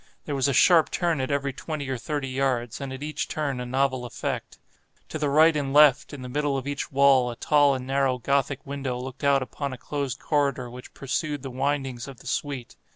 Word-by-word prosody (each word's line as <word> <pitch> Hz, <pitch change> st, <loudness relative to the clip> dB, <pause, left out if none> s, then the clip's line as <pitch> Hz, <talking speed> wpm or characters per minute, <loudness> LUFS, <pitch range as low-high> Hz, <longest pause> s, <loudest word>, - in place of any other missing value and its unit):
There 145 Hz, -, -3 dB
was 135 Hz, -1 st, +1 dB
a -, -, +2 dB
sharp 160 Hz, +5 st, +5 dB
turn 170 Hz, -5 st, 0 dB
at 130 Hz, -, -2 dB
every 140 Hz, -1 st, -1 dB
twenty 150 Hz, 0 st, -5 dB
or 130 Hz, -, -1 dB
thirty 135 Hz, +3 st, -3 dB
yards, 130 Hz, -3 st, -1 dB
and 135 Hz, -1 st, -5 dB
at 130 Hz, +2 st, -6 dB
each 155 Hz, 0 st, -3 dB
turn 140 Hz, -4 st, -2 dB
a 125 Hz, -, -4 dB
novel 130 Hz, 0 st, 0 dB
effect. 120 Hz, -4 st, -4 dB, 0.5 s
To 155 Hz, -, -4 dB
the 150 Hz, -1 st, 0 dB
right 155 Hz, +3 st, +5 dB
and 140 Hz, -2 st, -1 dB
left, 145 Hz, -3 st, +6 dB
in 140 Hz, -3 st, -8 dB
the -, -, -6 dB
middle 145 Hz, +1 st, 0 dB
of 135 Hz, -, -4 dB
each 145 Hz, 0 st, -4 dB
wall, 135 Hz, -2 st, +5 dB
a 120 Hz, -, -5 dB
tall 145 Hz, +1 st, +3 dB
and 130 Hz, -1 st, -5 dB
narrow 135 Hz, -1 st, +1 dB
Gothic 140 Hz, +1 st, 0 dB
window 135 Hz, -3 st, -3 dB
looked 130 Hz, +3 st, -8 dB
out 140 Hz, -1 st, +4 dB
upon 140 Hz, +1 st, -5 dB
a -, -, -7 dB
closed 140 Hz, -2 st, -3 dB
corridor 140 Hz, -5 st, 0 dB
which 125 Hz, +1 st, -11 dB
pursued 145 Hz, +1 st, -3 dB
the 135 Hz, -, -5 dB
windings 135 Hz, -2 st, -2 dB
of 135 Hz, -2 st, -10 dB
the -, -, -17 dB
suite. 135 Hz, -1 st, -4 dB
135 Hz, 220 wpm, -26 LUFS, 130-145 Hz, 0.5 s, left